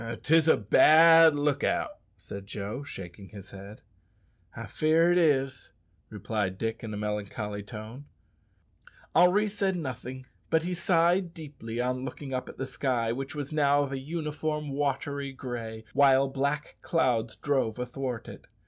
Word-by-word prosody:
"'Tis 160 +1 +4
a - - +6
bad 160 - +7
look 145 -1 0
out," - - -1 0.2
said 100 0 -9
Joe, 105 +5 -5
shaking 95 -7 -9
his 100 -2 -11
head. 100 +2 -11 0.7
"I - - -6
fear 160 +2 +2
it 175 - +3
is," 135 -5 +1 0.4
replied 105 -4 -3
Dick 115 +3 -3
in 110 - -5
a 105 - -5
melancholy 105 0 -4
tone. 110 +6 -9 1.1
Henri 195 +4 +5
said 200 -2 -1
nothing, 130 -4 -6 0.2
but 160 0 +2
he 180 +1 -2
sighed 175 0 +2
deeply 140 -8 -7
on 125 +1 -1
looking 135 +1 -6
up 130 - -3
at - - -11
the 135 - -3
sky, 125 -3 -1
which 135 +4 -5
was 145 0 -5
now 145 -1 +3
of 140 - -5
a 135 - -3
uniform 150 0 -3
watery 140 0 -2
gray, 115 -4 -6
while 135 0 +5
black 140 +3 -2
clouds 120 -8 0
drove 130 -6 -1
athwart 125 -1 -4
it. - - -11
135 Hz, 150 wpm, -28 LUFS, 115-155 Hz, 1.1 s, bad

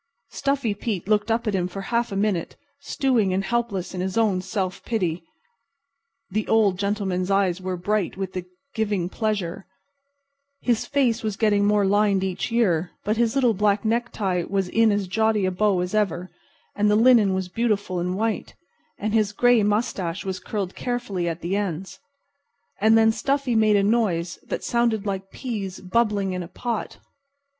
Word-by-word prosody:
Stuffy 275 -6 0
Pete 200 -3 -4
looked 210 +1 +2
up 230 +1 +1
at 215 - 0
him 180 -2 0
for 195 +2 -6
a 195 - -9
half 235 -1 +1
minute, 195 -3 -1 0.2
stewing 245 -9 +1
and 195 - 0
helpless 205 -5 -2
in 180 - -3
his 190 +3 -2
own 205 -5 +2
self 190 0 -3
pity. 180 -8 -1 1.1
The 215 +2 -1
Old 205 -5 +3
Gentleman's 200 -3 -1
eyes 195 -2 +1
were 185 -1 -3
bright 200 +1 -1
with 190 -1 -4
the 185 -1 -4 0.3
giving 205 -5 -1
pleasure. 200 -5 -2 0.9
His 235 -3 0
face 255 -5 +1
was 215 -3 -3
getting 205 -2 +3
more 205 -1 +3
lined 200 -1 +2
each 190 +3 -2
year, 185 -8 +2
but 215 +2 0
his 235 0 +1
little 250 -4 +3
black 205 +1 +1
necktie 220 -5 0
was 195 -2 0
in 225 +1 +4
as 205 -2 0
jaunty 220 +1 +1
a 185 - +1
bow 190 -1 +2
as 180 +2 -3
ever, 185 -4 0 0.4
and 210 0 +2
the 210 - +4
linen 220 -4 +5
was 190 -1 -2
beautiful 205 -2 -1
and 180 +2 -2
white, 220 0 -2 0.4
and 215 +1 -2
his 215 -2 +2
gray 245 +1 +4
mustache 205 -4 -1
was 190 -1 -3
curled 195 -4 -4
carefully 210 -8 -2
at 165 0 -5
the 175 +4 -1
ends. 190 -2 -3 0.8
And 220 +2 +5
then 225 0 +5
Stuffy 275 +2 0
made 215 -2 +4
a 200 - +3
noise 195 -6 0
that - - -3
sounded 235 -3 +1
like 195 -1 -3
peas 205 -7 -5
bubbling 200 -1 0
in 180 - -3
a 175 - -6
pot. 235 +3 -4
205 Hz, 175 wpm, -24 LUFS, 185-225 Hz, 1.1 s, linen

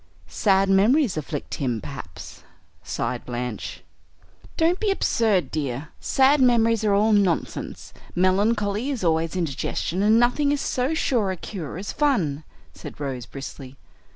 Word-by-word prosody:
"Sad 195 -2 +2
memories 215 - +3
afflict 150 -1 -5
him, 125 -4 0
perhaps," 90 -11 -9 0.4
sighed - - -3
Blanche. 120 -2 -5 0.7
"Don't 340 +2 +2
be 430 - 0
absurd, 220 - +1
dear, 145 -1 -3
sad 270 +2 +3
memories 230 -3 +3
are 205 -2 +3
all 215 +2 +3
nonsense; 195 -5 -1 0.2
melancholy 205 +5 +1
is 260 -8 -3
always 165 0 +1
indigestion, 170 +2 -2
and 215 +2 +5
nothing 265 +4 +2
is 290 - 0
so 265 +3 -1
sure 235 -9 +1
a 190 - -3
cure 170 -5 -6
as 195 +2 -5
fun," 180 - +1 0.3
said - - -10
Rose 130 -4 -4
briskly. 135 -1 -9
195 Hz, 135 wpm, -24 LUFS, 150-240 Hz, 0.7 s, and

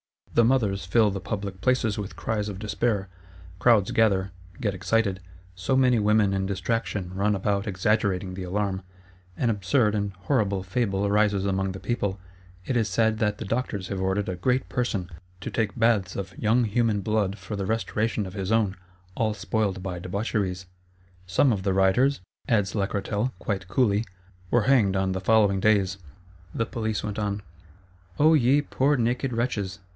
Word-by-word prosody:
The 115 - +5
mothers 105 -7 +1
fill 105 +3 +3
the 100 - -3
public 100 -1 -5
places 120 -5 +1
with 100 -5 -5
cries 105 +4 -2
of 100 - -6
despair; 105 0 -1 0.5
crowds 110 -4 +4
gather, 100 -4 +2 0.3
get 105 -4 -1
excited: 95 +1 0 0.3
so 95 +8 -1
many 125 -3 +4
women 105 -1 +3
in 95 0 -1
destraction 100 -1 -2
run 100 +2 +1
about 100 +2 -1
exaggerating 95 -1 0
the 95 - -6
alarm: 95 +1 -2 0.6
an 120 - +2
absurd 105 +2 +2
and 100 -2 -1
horrid 100 -1 0
fable 100 -1 0
arises 100 -1 +2
among 95 -1 0
the 95 - -7
people; 100 -4 -2 0.5
it 130 - -1
is 115 -3 +2
said 110 +2 +1
that 105 -1 +1
the - - -6
doctors 100 -3 -2
have 95 -2 -3
ordered 95 +1 0
a 90 - -2
Great 125 +8 0
Person 110 -7 -1 0.3
to - - -5
take 110 -2 -1
baths 110 -5 +2
of 95 -1 -5
young 115 +3 +2
human 110 -1 +1
blood 105 -1 0
for 95 +2 -6
the 100 -1 -3
restoration 110 0 -1
of 95 - -8
his 95 0 -3
own, 105 -4 +2 0.4
all 110 -2 0
spoiled 100 -1 -1
by 90 -2 -4
debaucheries. 95 0 -2 0.6
Some 110 +9 +3
of 100 -4 -1
the 95 0 0
rioters," 95 +8 +3 0.3
adds 105 -4 +1
Lacretelle, 105 +3 -1
quite 95 -4 -3
coolly, 105 +1 +2 0.4
"were 120 +1 +3
hanged 110 -6 +3
on 95 0 +1
the 95 0 -3
following 100 -1 +3
days:" 100 -2 +2 0.6
the 115 - 0
Police 110 -3 -3
went 105 0 -3
on. 100 -1 -2 0.7
O 155 +2 +5
ye 140 0 +4
poor 145 0 +1
naked 125 +2 0
wretches! 110 -6 -2
105 Hz, 170 wpm, -26 LUFS, 95-115 Hz, 0.7 s, The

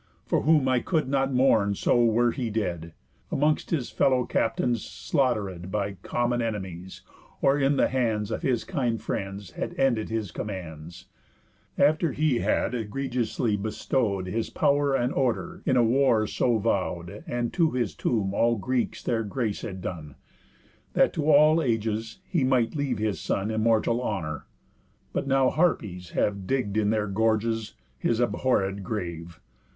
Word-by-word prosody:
For - - +1
whom 150 -3 +3
I 130 -1 +3
could 155 +2 0
not 135 0 +1
mourn 110 -6 +3
so 120 +4 +2
were 120 +1 +3
he 125 -3 -3
dead, 90 -7 -3 0.4
Amongst 150 +2 +1
his 140 -8 -1
fellow 130 -2 +2
captains 115 +1 0
slaughteréd 105 - -1
By 100 -1 -2
common 120 +3 0
enemies, 95 -5 -5 0.4
or 135 +1 +3
in 140 0 +2
the - - +4
hands 115 -5 -1
Of - - -2
his 130 -8 0
kind 120 -5 -1
friends 100 -3 -5
had - - -5
ended 120 -5 +1
his 110 -5 -3
commands, 85 -4 -7 0.7
After 155 +1 +3
he 150 -5 +1
had - - 0
egregiously 120 -1 -1
bestow'd 105 -1 -1
His 110 +5 -2
pow'r 140 -1 +2
and 125 +1 0
order 135 +8 -1
in 130 -3 +3
a 120 - +5
war 115 -2 +3
so 120 +2 +1
vow'd, 95 -1 -2
And 120 -1 -2
to 165 -3 +3
his 120 - -1
tomb 100 +4 -1
all 115 +3 +3
Greeks 125 +4 -2
their 115 -2 0
grace 110 0 -2
had 95 -3 -6
done, 80 -6 -6 0.8
That - - +3
to 155 0 -1
all 155 +2 +6
ages 115 -3 -1
he 170 -7 0
might 125 -3 +2
leave 145 -3 -1
his 105 -2 -1
son 100 +3 -1
Immortal 115 +2 +2
honour; 85 -10 -3 0.7
but 140 - -2
now 135 -1 +3
Harpies 105 - 0
have 100 -2 0
Digg'd 125 -7 -1
in 105 -1 +2
their 110 -1 +1
gorges 110 +2 0 0.2
his 115 - 0
abhorréd 100 -5 +1
grave. 85 -4 -5
115 Hz, 155 wpm, -26 LUFS, 100-130 Hz, 0.8 s, all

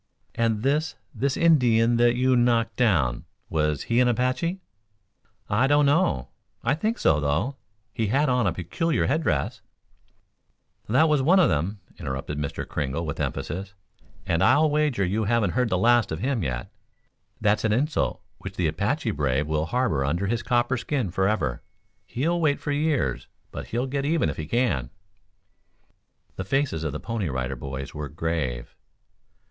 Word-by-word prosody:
"And 115 -2 0
this 150 +4 +1 0.2
this 135 +3 -1
Indian 120 -8 +4
that 120 0 +4
you 130 +1 +3
knocked 120 -1 +2
down 80 - +1 0.3
was 75 -3 0
he 115 +1 +1
an 125 - +4
Apache?" 130 +9 0 0.9
"I 120 +6 +2
don't 145 +1 +4
know. 140 - +2 0.3
I 120 - +2
think 215 +10 -1
so, 75 - +3
though. 80 - -1 0.4
He 115 -3 -1
had 140 +8 +2
on 125 -4 +2
a - - +2
peculiar 90 - -1
head 155 +4 +1
dress 75 - -1 1.3
"That 135 +8 +4
was 150 -3 +2
one 175 +8 +5
of 180 - +5
them," 95 +7 -1 0.2
interrupted 70 -1 -4
Mr. 70 -1 -4
Kringle, 75 +3 -3
with 75 - -4
emphasis. 95 +5 -4 0.5
"And 85 0 0
I'll 155 +1 +4
wager 150 -9 +1
you 105 +4 0
haven't 110 -3 +2
heard 125 +2 +1
the 90 - +1
last 115 0 +3
of 80 - -2
him 125 - -1
yet. 65 -6 -3 0.7
That's 105 0 +2
an 110 - +2
insult 145 +8 0 0.2
which - - -8
the - - 0
Apache - - 0
brave 70 0 0
will 80 +1 -1
harbor 120 - 0
under 85 +8 -1
his 115 +3 -1
copper 125 +1 +1
skin 125 - -2
forever. 95 - 0 0.5
He'll 170 +7 -1
wait 145 -3 +2
for 145 - -3
years, 145 - 0 0.2
but - - -7
he'll 120 +3 -1
get 135 +1 -2
even 160 +2 +1
if - - -10
he 80 - -5
can." 85 - 0 1.5
The - - -3
faces 135 - 0
of 75 - -2
the 75 - -5
Pony 115 -7 -3
Rider 65 0 -2
Boys 65 +1 -6
were 75 -2 -5
grave. 75 -6 -3
115 Hz, 165 wpm, -25 LUFS, -, 1.5 s, one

